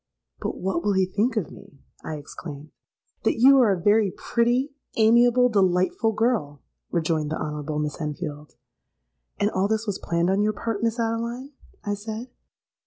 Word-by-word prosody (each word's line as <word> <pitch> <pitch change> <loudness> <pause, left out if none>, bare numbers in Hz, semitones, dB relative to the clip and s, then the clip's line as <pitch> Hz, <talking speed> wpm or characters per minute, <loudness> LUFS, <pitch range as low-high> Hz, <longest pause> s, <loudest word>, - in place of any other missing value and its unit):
'—'But - - -4
what 180 -2 -1
will 205 - +2
he 190 -1 +3
think 210 +6 0
of 195 - -2
me?' 140 - -15 0.2
I 155 - -4
exclaimed.—'That 150 +6 -7
you 270 +3 +7
are 235 -5 +5
a 190 - 0
very 205 +3 +3
pretty, 245 +8 0 0.2
amiable, 240 +2 +5
delightful 190 0 +2
girl,' 210 - -1 0.3
rejoined 160 -3 0
the 155 - -3
Honourable 150 0 -4
Miss 150 +2 -3
Enfield.—'And 150 - -7
all 190 +1 +1
this 220 +1 -1
was 205 -3 -3
planned 170 +2 +1
on 195 +2 +2
your 215 +1 +1
part, 220 0 -3
Miss 230 +1 0
Adeline?' 235 +4 -2 0.3
I 205 - 0
said. 220 +4 -6
200 Hz, 155 wpm, -24 LUFS, 155-230 Hz, 0.3 s, you